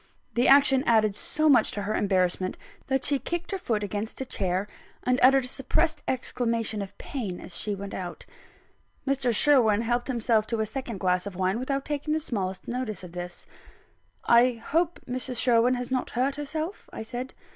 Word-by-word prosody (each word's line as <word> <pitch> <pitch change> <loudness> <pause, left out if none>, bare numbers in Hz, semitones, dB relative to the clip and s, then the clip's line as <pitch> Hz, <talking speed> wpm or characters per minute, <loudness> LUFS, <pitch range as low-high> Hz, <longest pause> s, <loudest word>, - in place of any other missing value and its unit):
The 240 +2 +2
action 270 -1 +6
added 215 -3 +3
so 310 +8 -1
much 255 -7 +5
to 205 - -3
her 210 +2 -2
embarrassment 185 -2 0 0.3
that 265 -1 0
she 280 0 +3
kicked 345 +6 -4
her 390 - -2
foot 220 -10 -1
against 205 +2 -4
a 265 - -3
chair, 190 -4 -1 0.4
and 250 0 +2
uttered 265 0 +6
a - - -3
suppressed 310 +5 0
exclamation 230 -4 -1
of 195 - -8
pain 205 -10 -5
as - - -8
she 210 -1 -2
went 200 0 -7
out. 180 -2 -6 0.8
Mr. 270 -3 +1
Sherwin 230 -4 +5
helped 240 +1 -1
himself 230 -4 +1
to 230 - -2
a 220 - +1
second 235 -2 -5
glass 180 +1 +1
of 195 - -7
wine, 190 +4 0
without 275 +2 -2
taking 300 +1 -1
the - - +1
smallest 190 - -4
notice 240 -6 -3
of 180 - -9
this. 175 0 -6 0.8
"I 240 +2 +5
hope 320 +9 -1
Mrs. 255 0 -3
Sherwin 245 0 +4
has 245 +1 -5
not 255 -1 -1
hurt 260 +3 0
herself?" 310 +6 -5
I - - -6
said. 245 +3 -6
240 Hz, 185 wpm, -27 LUFS, 205-270 Hz, 0.8 s, action